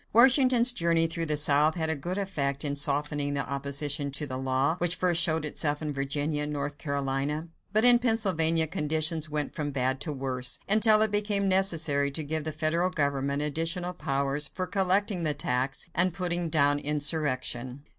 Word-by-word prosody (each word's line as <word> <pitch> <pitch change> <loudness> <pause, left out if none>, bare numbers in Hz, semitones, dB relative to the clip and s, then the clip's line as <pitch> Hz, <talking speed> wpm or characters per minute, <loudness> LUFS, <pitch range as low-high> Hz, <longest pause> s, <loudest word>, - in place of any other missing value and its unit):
Washington's 250 0 +6
journey 170 -5 +1
through 165 0 -3
the 150 -1 0
South 150 +2 +3
had 160 -2 -2
a - - -1
good 175 +7 -5
effect 150 -8 -3
in 145 -1 -2
softening 145 0 -1
the 140 - -3
opposition 140 +1 -1
to 140 +2 -2
the 130 -3 -6
law, 130 +4 -1
which 175 0 0
first 175 -2 +2
showed 160 -3 0
itself 145 0 -1
in 150 -2 -4
Virginia 145 +2 -3
and 150 0 -3
North 145 0 -5
Carolina; 140 +2 -3 0.2
but 215 +3 +2
in 245 -1 +8
Pennsylvania 185 -9 +1
conditions 155 +1 0
went 150 -1 -3
from 150 -2 -4
bad 130 -1 -2
to 155 - -3
worse, 130 -3 -2
until 215 +1 +6
it 220 - -1
became 205 -1 -1
necessary 165 -7 +1
to 155 +3 -5
give 155 +1 -4
the 155 - -3
federal 160 +4 -1
government 140 -3 -2
additional 165 +4 -2
powers 140 -2 -2
for 185 +5 -5
collecting 195 0 +1
the 155 -3 0
tax 130 -1 -2
and 180 +1 +3
putting 175 -2 -1
down 145 -2 +2
insurrection. 145 -4 -2
150 Hz, 175 wpm, -27 LUFS, 140-175 Hz, 0.2 s, in